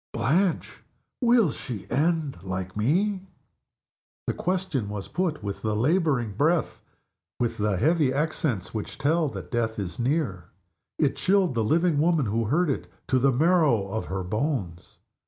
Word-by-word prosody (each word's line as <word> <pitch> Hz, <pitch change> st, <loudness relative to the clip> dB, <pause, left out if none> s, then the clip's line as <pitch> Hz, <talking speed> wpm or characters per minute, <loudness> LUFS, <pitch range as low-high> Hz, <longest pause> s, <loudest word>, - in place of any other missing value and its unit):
Blanche! 160 Hz, +11 st, 0 dB, 0.4 s
Will 235 Hz, -, +4 dB
she 115 Hz, -8 st, -6 dB
end 155 Hz, -, 0 dB
like 95 Hz, 0 st, -5 dB
Me?" 185 Hz, -, +1 dB, 1.0 s
The -, -, 0 dB
question 180 Hz, -, -2 dB
was 105 Hz, -2 st, -5 dB
put 170 Hz, -, -2 dB
with 100 Hz, -1 st, -4 dB
the 110 Hz, -1 st, -1 dB
laboring 135 Hz, -, +1 dB
breath, 155 Hz, -, 0 dB, 0.6 s
with 115 Hz, -2 st, -1 dB
the 105 Hz, -2 st, +1 dB
heavy 155 Hz, -, +3 dB
accents 140 Hz, -, -1 dB
which 110 Hz, -2 st, -5 dB
tell 155 Hz, +3 st, +2 dB
that -, -, -8 dB
death 115 Hz, -2 st, -1 dB
is 95 Hz, 0 st, -4 dB
near. 120 Hz, -, -1 dB, 0.5 s
It 145 Hz, -3 st, +1 dB
chilled 190 Hz, -4 st, +2 dB
the 115 Hz, -2 st, 0 dB
living 165 Hz, +5 st, +2 dB
woman 160 Hz, -3 st, +3 dB
who 115 Hz, +2 st, 0 dB
heard 155 Hz, +7 st, +2 dB
it -, -, -4 dB, 0.2 s
to 130 Hz, -, +3 dB
the 135 Hz, +2 st, +4 dB
marrow 145 Hz, -, +3 dB
of 110 Hz, +3 st, -3 dB
her 95 Hz, 0 st, -3 dB
bones. 105 Hz, -, -3 dB
135 Hz, 150 wpm, -26 LUFS, 105-165 Hz, 1.0 s, Will